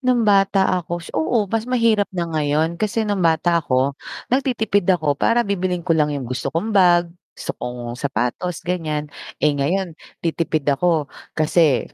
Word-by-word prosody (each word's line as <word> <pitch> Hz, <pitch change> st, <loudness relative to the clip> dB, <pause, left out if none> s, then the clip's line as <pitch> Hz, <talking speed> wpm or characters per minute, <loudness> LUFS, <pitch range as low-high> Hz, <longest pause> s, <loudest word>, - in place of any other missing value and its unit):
Nung 250 Hz, -3 st, +2 dB
bata 195 Hz, -1 st, +4 dB, 0.2 s
ako, 175 Hz, 0 st, -5 dB
oo 210 Hz, +7 st, +1 dB
mas 225 Hz, +2 st, -1 dB
mahirap 230 Hz, -5 st, +2 dB
na 175 Hz, -2 st, -2 dB
ngayon. 155 Hz, +2 st, 0 dB
Kasi 220 Hz, +1 st, 0 dB
nung 205 Hz, -2 st, -1 dB
bata 170 Hz, +1 st, +2 dB
ako, 130 Hz, -1 st, +1 dB, 0.4 s
nagtitipid 220 Hz, -8 st, +1 dB
ako 160 Hz, -6 st, +3 dB
para 235 Hz, +10 st, +2 dB
bibilhin 180 Hz, -3 st, -2 dB
ko 170 Hz, -, +2 dB
lang 150 Hz, -2 st, +2 dB
yung 135 Hz, -, -5 dB
gusto 130 Hz, +1 st, -3 dB
kong 210 Hz, +7 st, -2 dB
bag, 175 Hz, -3 st, +4 dB, 0.2 s
gusto -, -, -4 dB
kong 120 Hz, -1 st, -5 dB
sapatos, 140 Hz, +7 st, -3 dB
ganyan. 155 Hz, -4 st, -2 dB, 0.3 s
Eh 150 Hz, -, +3 dB
ngayon, 170 Hz, +5 st, -1 dB, 0.3 s
titipid 160 Hz, -2 st, -1 dB
ako 150 Hz, +1 st, +2 dB, 0.3 s
kasi 155 Hz, -3 st, +3 dB
170 Hz, 155 wpm, -21 LUFS, 150-200 Hz, 0.4 s, bata